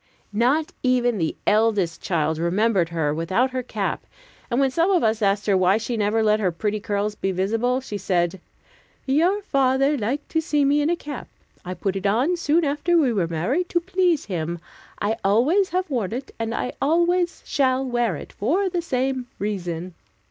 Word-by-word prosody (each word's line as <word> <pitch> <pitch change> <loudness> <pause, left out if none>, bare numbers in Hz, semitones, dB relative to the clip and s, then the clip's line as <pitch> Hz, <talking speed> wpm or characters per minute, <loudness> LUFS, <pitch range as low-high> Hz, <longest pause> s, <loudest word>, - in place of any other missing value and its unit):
Not 260 +9 +2
even 245 -4 +2
the 160 -2 -1
eldest 210 -5 +2
child 160 -3 0
remembered 185 +1 +1
her 160 -3 -1
without 185 +11 0
her 255 0 -2
cap, 250 - -3 0.4
and 240 - 0
when 270 -1 +2
some 335 +7 +2
of 370 -4 +3
us 220 0 +1
asked 200 0 +1
her 200 - +3
why 185 +2 +4
she 225 +2 -3
never 220 +1 +1
let 215 0 +3
her 190 -4 +1
pretty 210 +5 -2
curls 205 +1 -2
be 195 -2 -2
visible, 225 +7 0
she 210 -6 -6
said, 180 -1 0 0.6
"Your 345 +9 +2
father 275 -3 +2
liked 255 +8 -2
to 320 - +1
see 295 -3 +1
me 290 +2 +3
in 295 - +1
a 345 - +2
cap. 290 -5 -7 0.4
I 185 +1 -5
put 195 0 -2
it 195 +1 -1
on 250 - +2
soon 335 -1 +1
after 295 +5 +1
we 270 -7 +3
were 185 -6 0
married, 230 - -1
to 345 - +2
please 355 -3 +1
him; 170 -3 -3 0.4
I 215 +2 0
always 275 - +3
have 370 +1 -1
worn 230 - -2
it, 265 +3 -5
and 225 +1 -2
I 250 - -3
always 345 +4 +1
shall 265 -1 +1
wear 240 -6 0
it, - - -9
for 355 - 0
the 355 -1 -1
same 260 -4 -1
reason." 180 -4 -4
235 Hz, 190 wpm, -23 LUFS, 195-290 Hz, 0.6 s, why